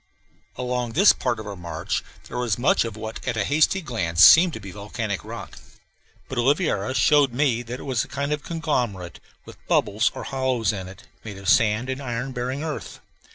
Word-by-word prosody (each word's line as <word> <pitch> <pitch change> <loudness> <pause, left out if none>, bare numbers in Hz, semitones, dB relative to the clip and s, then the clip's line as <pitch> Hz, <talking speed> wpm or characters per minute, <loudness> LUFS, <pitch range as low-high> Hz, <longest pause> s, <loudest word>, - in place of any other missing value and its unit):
Along 125 -2 -3
this 195 +6 +6
part 120 -3 -2
of 110 - -7
our 100 -1 -6
march 85 -2 -4 0.2
there 125 - -5
was 120 -4 0
much 120 -1 +2
of 110 -2 -6
what 110 0 -7
at 120 -3 -1
a 105 - +1
hasty 155 +6 +2
glance 85 - +3
seemed 170 - +8
to - - -6
be 100 -2 -9
volcanic 105 +1 -4
rock; - - -9 0.7
but 130 - -4
Oliveira 130 - +1
showed 145 -4 +4
me 125 -3 +1
that 120 +2 -7
it - - -9
was 130 -5 0
a - - -10
kind 140 +1 -2
of 150 - -3
conglomerate, 125 - -3 0.3
with - - -14
bubbles 105 +3 +2
or - - -6
hollows 130 -6 0
in 95 -2 -6
it, 95 - -12 0.2
made 105 -3 -8
of 95 0 -9
sand 110 +1 +3
and 130 +1 -4
iron 125 0 -4
bearing 130 +3 -3
earth. 155 -2 -6
120 Hz, 200 wpm, -24 LUFS, 105-135 Hz, 0.7 s, seemed